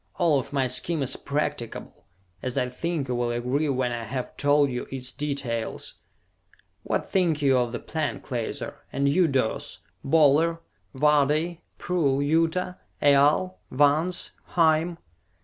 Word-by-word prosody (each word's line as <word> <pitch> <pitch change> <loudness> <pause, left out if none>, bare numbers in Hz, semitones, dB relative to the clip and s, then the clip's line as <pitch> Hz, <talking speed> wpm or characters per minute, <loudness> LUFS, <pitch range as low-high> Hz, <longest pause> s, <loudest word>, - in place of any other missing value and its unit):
"All 165 -6 +3
of - - -7
my 135 -2 +1
scheme 140 +5 +2
is 130 - -1
practicable, 140 -4 -4 0.4
as 130 -1 -3
I 125 - +1
think 155 +2 -3
you 125 - -2
will 120 0 0
agree 125 +6 -1
when 130 -2 0
I 120 -1 -4
have 125 +3 -5
told 145 -1 +3
you 125 - -4
its 130 -1 -5
details. 140 -6 -3 0.9
What - - -2
think 175 -5 +1
you 135 -2 +4
of 120 -1 0
the 120 - -3
plan, 155 -2 -3
Klaser? 120 -5 -5
And 140 0 0
you, 170 +5 +4
Durce? 130 -6 -1 0.3
Boler? 160 +3 +4 0.4
Vardee? 150 +4 +2 0.2
Prull? 150 -7 0
Yuta? 165 +5 0 0.2
Aal? 145 +6 +4
Vance? 150 +6 +1 0.3
Hime?" 165 +1 +3
145 Hz, 140 wpm, -26 LUFS, 130-160 Hz, 0.9 s, you